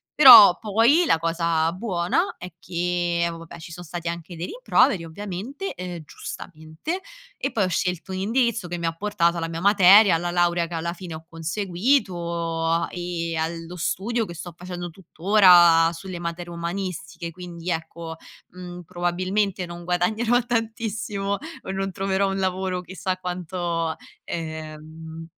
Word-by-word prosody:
Però 230 -10 +10
poi 230 - +3
la - - +4
cosa 165 0 0
buona 185 -1 -1
è 180 -1 -9
che, 175 -1 -1
vabbè, 165 -1 -10
ci 160 - -10
son 175 +1 -8
stati 170 0 -6
anche 170 +1 -5
dei 170 +2 -4
rimproveri, 350 - +2
ovviamente, 205 - -6
ehm, 180 -2 -7
giustamente 160 - -7 0.3
e - - -3
poi 210 - +1
ho - - +1
scelto 180 +1 -2
un 185 - -3
indirizzo 230 -1 0
che 175 0 -4
mi 170 - -4
ha 165 - 0
portato 175 -3 +1
alla 165 0 -3
mia 165 0 -4
materia, 200 0 +7
alla 170 +1 0
laurea 175 -1 +1
che 170 - -6
alla 170 +1 -2
fine 175 -2 -8
ho 160 +1 -10
conseguito 170 - -1
a 165 +1 +1
e 175 -2 -3
allo 165 +2 -4
studio 220 +7 -1
che 170 -3 -9
sto 170 +1 -8
facendo 175 0 -7
tutt'ora 175 -2 +5
sulle 180 +1 -7
materie 175 0 -5
umanistiche. 170 -1 -5
Quindi 175 0 -6
ecco, 160 0 -5 0.4
mhmm, 180 -1 -9
probabilmente 185 +3 -1
non 175 0 -9
guadagnerò 215 +7 +1
tantissimo 220 -4 -2 0.3
o 190 - -5
non 195 0 -2
troverò 195 +1 0
un 195 - -2
lavoro 185 -1 -1
chissà 185 +1 -4
quanto 175 -2 -3 0.3
ehm 160 0 -7
175 Hz, 150 wpm, -24 LUFS, 170-195 Hz, 0.4 s, Però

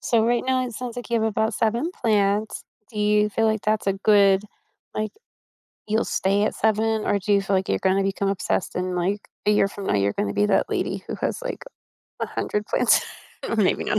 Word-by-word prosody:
So 225 -2 +2
right 240 +1 +1
now, 260 -1 +1
it 240 - -7
sounds 245 0 -6
like 245 0 -7
you 235 -1 +2
have 220 - +2
about 220 0 0
7 235 +10 0
plants. 210 - 0 0.3
Do 215 - -7
you 210 0 +3
feel 225 +2 +1
like 220 -1 0
that's 215 -1 0
a 195 - +3
good, 200 -1 +4 0.5
like 215 0 -2 0.7
you'll 220 +1 +1
stay 200 +2 +1
at - - -1
7, 220 0 +1
or 205 - +2
do 205 +2 -1
you 200 -1 +4
feel 195 0 +1
like 190 0 -1
you're - - +1
gonna 190 +1 +2
become 195 0 -1
obsessed 195 -2 -1
in, 180 0 -2
like, 185 +4 0 0.3
a - - +5
year 210 -1 +4
from 200 0 -8
now, - - +1
you're 100 0 +2
gonna 100 0 -2
be 205 - +2
that 205 - +1
lady - - -2
who - - -4
has, - - -3
like, - - -5 0.6
100 210 0 -2
plants - - +3 0.5
or 230 - -1
maybe 205 -4 +2
not. 215 - +1
210 Hz, 220 wpm, -24 LUFS, 195-220 Hz, 0.7 s, a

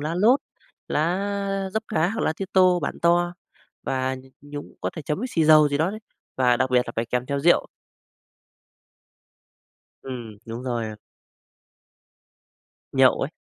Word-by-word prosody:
lá 155 +3 -2
lốt, 225 +9 +4 0.5
lá 195 +4 -1
dấp 220 +2 -1
cá 160 +2 +1
hoặc 225 +3 -3
lá - - +1
tía 195 - -3
tô 185 -1 +5
bản 140 - -3
to 175 +1 +3 0.5
và 130 0 -1
nh 130 - -10 0.2
nhúng 145 0 -9
có - - -2
thể 160 - -7
chấm 150 +4 -2
với 250 - -2
xì 165 -7 +2
dầu 155 -1 +7
gì 145 0 -1
đó 165 +4 +2
đấy, 215 - -6 0.4
và 125 -2 +3
đặc 130 0 0
biệt 125 -1 +4
là - - -6
phải 115 +1 -1
kèm 125 +1 -2
theo 140 0 -1
rượu. 175 +4 +4 2.4
Ừm, 120 -5 -7
đúng 115 +2 -6
rồi 120 -3 -2
ạ. 110 -1 -7 2.0
Nhậu 130 -1 +4
ấy. 135 - -2
150 Hz, 165 wpm, -24 LUFS, 130-180 Hz, 2.4 s, dầu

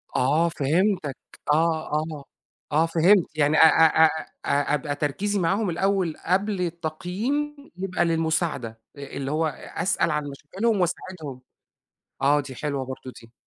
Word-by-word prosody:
آه، 155 +6 +3
فهمتك 165 0 0 0.4
آه، 160 0 +1
آه. 155 -2 -2 0.5
آه، 155 +3 +3
فهمت، 170 +3 +4
يعني 150 +1 +3
أ - - +7
أ 160 0 +6
أ - - +7 0.4
أ 145 +1 +1
أبقى 145 0 -1
تركيزي 190 +9 -1
معاهم 195 +4 +1
الأول 185 -2 0
قبل 195 +2 +1
التقييم، 180 - -2 0.2
يبقى 185 -2 0
للمساعدة، 160 -8 -1 0.2
اللي 140 0 -5
هو 160 +1 +1
أ 145 - -6
أسأل 175 -3 +1
عن 150 -1 -1
مشاكلهم 190 +10 -1
وأساعدهم، 160 -6 -4 0.8
آه، 145 +2 +4
دي 135 -2 -8
حلوة 140 -1 -3
برضه 130 0 -7
دي. 115 0 -17
160 Hz, 140 wpm, -25 LUFS, 145-185 Hz, 0.8 s, أ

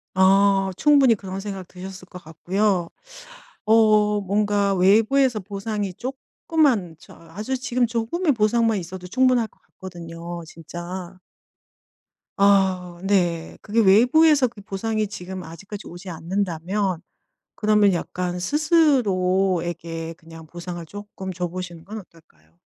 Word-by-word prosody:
어 195 +1 +4
충분히 280 -6 +5
그런 195 -1 -7
생각 195 -3 -6
드셨을 185 0 -10
것 180 -1 -12
같고요 180 +3 0 0.8
어 215 -1 +4
뭔가 200 0 +1
외부에서 220 +6 +3
보상이 200 0 -4
쪼끔만 255 - -1
저 - - -16 0.2
아주 215 +8 -3
지금 250 -1 0
조금의 260 +9 0
보상만 225 -1 +2
있어도 180 +1 -8
충분할 255 +2 +2
것 - - -32
같거든요 170 -2 -9
진짜. 175 +3 -8 1.2
아 190 -3 +2
네. 175 -4 0
그게 220 +2 -1
외부에서 255 +8 +5
그 225 -3 -13
보상이 215 +2 -2
지금 185 -2 -7
아직까지 195 +6 -9
오지 175 +2 -9
않는다면 180 +2 -2 0.6
그러면 210 -2 +3
약간 180 +1 -3
스스로에게 185 - +1
그냥 165 -1 -14
보상을 175 +1 -7
쪼끔 195 0 -8
줘보시는 175 -1 -5
건 215 +5 -7
어떨까요? 85 - -21
195 Hz, 270 characters per minute, -23 LUFS, 175-215 Hz, 1.2 s, 충분히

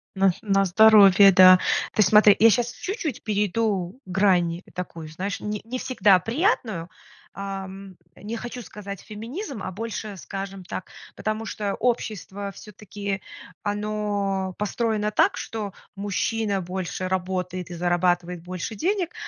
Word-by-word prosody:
На 195 0 +4
на 195 -3 +2
здоровье, 200 0 +7
да. 185 0 +8 0.3
Ты - - +3
смотри, 210 +1 +7
я 225 +1 +8
сейчас 240 +2 +1
чуть-чуть 345 - -4
перейду 205 -1 -1
грань 180 -2 +2
такую, 170 -3 -6
знаешь, 190 +6 -4
не 210 0 -4
не 240 +4 -5
всегда 205 -8 +4
приятную. 225 - -1 0.5
Ам, 195 -1 -7 0.2
не 220 +3 -6
хочу 240 +1 -6
сказать 200 0 -8
феминизм, 230 - -7
а 185 - -4
больше 215 0 -5
скажем 195 +1 -7
так. 180 - -7 0.3
Потому 215 +1 -3
что 205 -2 -3
общество, 205 -4 -2
всё-таки, 200 -1 -6 0.4
оно 205 -2 -2
построено 210 0 -1
так, - - +3
что 210 -3 -5 0.2
мужчина 205 0 -1
больше 185 0 -4
работает, 185 -1 -3
и 175 - -7
зарабатывает 175 0 0
больше 180 +3 -5
денег, 355 - -1
200 Hz, 130 wpm, -24 LUFS, 185-215 Hz, 0.5 s, да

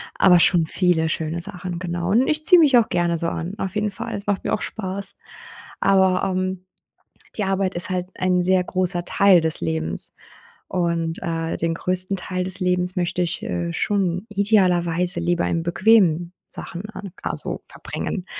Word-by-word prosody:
aber 180 -2 +5
schon 170 -2 +3
viele 165 -2 +1
schöne 160 +1 -3
Sachen, 180 -2 -5
genau. 175 0 -3
Und 240 +5 +3
ich 310 0 -1
ziehe 360 0 +8
mich 280 -6 +6
auch 230 - +3
gerne 170 -1 0
so 165 +1 0
an. 170 +4 -4
Auf 190 -3 -4
jeden 210 0 0
Fall. - - -6
Das 200 0 -6
macht 205 -2 0
mir - - -1
auch - - -1
Spaß. 195 -2 -5 0.6
Aber, 190 -2 +3
ähm, 185 -1 -2 0.7
die 210 - 0
Arbeit 195 0 -1
ist 175 - +1
halt 180 -1 -2
ein 180 -1 +1
sehr 185 0 +4
großer 180 -1 -1
Teil 195 -3 +4
des 160 -1 +1
Lebens. 80 0 -1 0.6
Und, 170 -2 -1
äh, 165 -2 -3
den 165 0 -1
größten 185 +3 0
Teil 185 0 -3
des 185 +1 0
Lebens 180 0 +1
möchte 180 0 -1
ich, 170 - -3
äh, 85 -1 -3
schon 185 - -1
idealerweise 180 -4 +1
lieber 170 0 0
in 165 -1 -1
bequemen 175 -2 +3 0.2
Sachen 185 +5 -7
an 200 -3 -8
also, - - -4
verbringen. 185 -3 -5
180 Hz, 175 wpm, -22 LUFS, 170-195 Hz, 0.7 s, ziehe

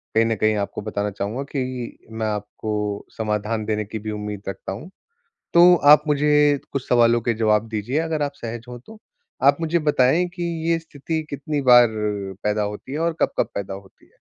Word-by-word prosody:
कहीं 115 - +5
न 115 -1 0
कहीं 110 +1 +2
आपको 100 0 -3
बताना 105 -1 -3
चाहूँगा 105 +7 -4
कि 125 -4 -4
मैं 110 -1 -2
आपको 105 0 -3
समाधान 105 0 -2
देने 105 -1 -1
की 110 +2 -6
भी 110 +1 -5
उम्मीद 105 -1 -5
रखता 95 - -6
हूँ। 115 - -7 0.7
तो 175 +1 +8 0.2
आप 150 0 +6
मुझे 150 0 +3
कुछ 140 -2 -4
सवालों 120 -1 +4
के 115 0 0
जवाब 110 0 +1
दीजिए 110 +6 -2
अगर 160 -2 -1
आप 145 -1 -1
सहज 115 -2 -7
हों 120 0 -7
तो, 215 - -15 0.4
आप 140 +1 +6
मुझे 165 +1 +1
बताएंँ 150 +3 +3
कि 175 0 -8 0.3
ये 165 - +3
स्थिति 160 0 -4
कितनी 145 +1 -3
बार 120 -2 +7 0.6
पैदा 105 0 0
होती 105 +6 -5
है 150 - -2
और 165 0 +1
कब-कब - - 0
पैदा 100 -1 -4
होती 95 -1 -14
है? - - -32
115 Hz, 190 wpm, -22 LUFS, 105-145 Hz, 0.7 s, तो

